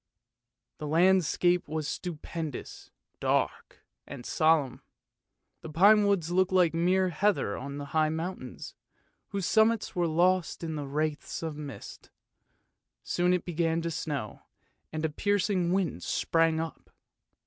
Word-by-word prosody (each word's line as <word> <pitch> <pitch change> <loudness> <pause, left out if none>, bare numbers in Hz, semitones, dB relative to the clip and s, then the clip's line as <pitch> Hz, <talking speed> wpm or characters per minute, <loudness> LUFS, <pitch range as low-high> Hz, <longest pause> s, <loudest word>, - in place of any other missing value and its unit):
The 150 - -4
landscape 175 +1 +3
was 155 0 -3
stupendous, 160 -3 -6 0.3
dark, - - -1 0.2
and 135 -4 -9
solemn. 155 -5 +2 0.8
The 160 - -8
pine 205 +6 +5
woods 175 -5 +1
looked 185 +1 +2
like 180 -3 +4
mere 180 +3 +2
heather 180 - +1
on 140 +2 -6
the 145 - -5
high 155 -1 +3
mountains, 160 -4 -5 0.5
whose 195 -2 -3
summits 220 +2 +2
were 175 -1 +1
lost 175 +2 +1
in 160 -2 -3
wreaths 155 +2 -2
of 160 -2 -4
mist. 145 -2 -9 0.9
Soon 180 0 +1
it 180 -2 0
began 165 -1 0
to 170 - -2
snow, 145 -8 -4 0.5
and 155 0 -2
a - - +1
piercing 195 0 0
wind 190 -2 0
sprang 165 -1 +1
up. 165 -1 -6
165 Hz, 125 wpm, -29 LUFS, 155-185 Hz, 0.9 s, pine